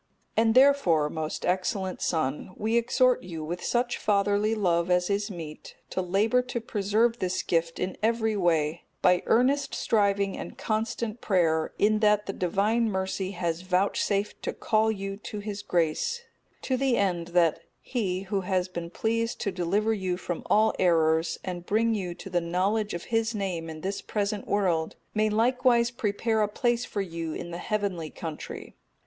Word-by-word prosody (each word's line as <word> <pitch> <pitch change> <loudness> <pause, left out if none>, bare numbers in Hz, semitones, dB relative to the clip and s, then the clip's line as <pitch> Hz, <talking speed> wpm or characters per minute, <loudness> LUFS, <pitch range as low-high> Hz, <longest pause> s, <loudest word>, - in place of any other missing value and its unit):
And, 225 0 +3
therefore, 255 - +5
most 155 -1 -4
excellent 185 +1 -1
son, 155 +2 -1
we 220 +2 0
exhort 250 +2 +3
you 165 -3 -6
with 170 +3 -5
such 240 0 0
fatherly 205 +1 +2
love 175 -4 +1
as 180 +2 +2
is 205 +2 0
meet, 165 -5 -8 0.2
to 185 - -1
labour 205 +7 +2
to 250 -1 -4
preserve 225 +2 +1
this 185 -1 -1
gift 165 -1 0
in 185 0 -2
every 220 0 +1
way, 165 -4 +1 0.2
by 180 -1 +5
earnest 275 +4 +2
striving 200 -3 +1
and - - -7
constant 220 +1 -2
prayer, 165 -5 +1
in 215 +1 +3
that 210 -1 +3
the 195 - -3
Divine 210 +6 +1
Mercy 190 0 -2
has 170 -2 -2
vouchsafed 195 +2 0
to - - -3
call 220 0 +2
you 195 -1 -4
to 210 0 -7
His 205 0 -5
grace; 175 - 0 0.4
to 260 - 0
the 265 -2 +2
end 175 -4 0
that 165 -3 +4 0.2
He, 190 -7 -2
Who 195 0 -2
has 185 -1 0
been 170 -2 -6
pleased 230 +5 -1
to 200 - -1
deliver 195 +5 +1
you 185 -4 -2
from 175 -2 -4
all 220 +1 +4
errors, 165 -2 +3
and 175 -2 -5
bring 225 +2 +2
you 180 -5 -3
to 195 - -9
the 175 -1 +1
knowledge 190 +5 0
of 170 - -5
His 225 0 +1
name 180 -5 -3
in 155 -1 -8
this 195 +3 -3
present 205 -1 -2
world, 175 -6 +1 0.2
may 215 0 +2
likewise 240 +2 +3
prepare 220 -2 0
a 210 - +3
place 240 +2 0
for 205 - -3
you 165 -4 -4
in 170 - -6
the 170 - -5
heavenly 195 -6 -2
country. 160 -1 -7
200 Hz, 170 wpm, -27 LUFS, 175-220 Hz, 0.4 s, therefore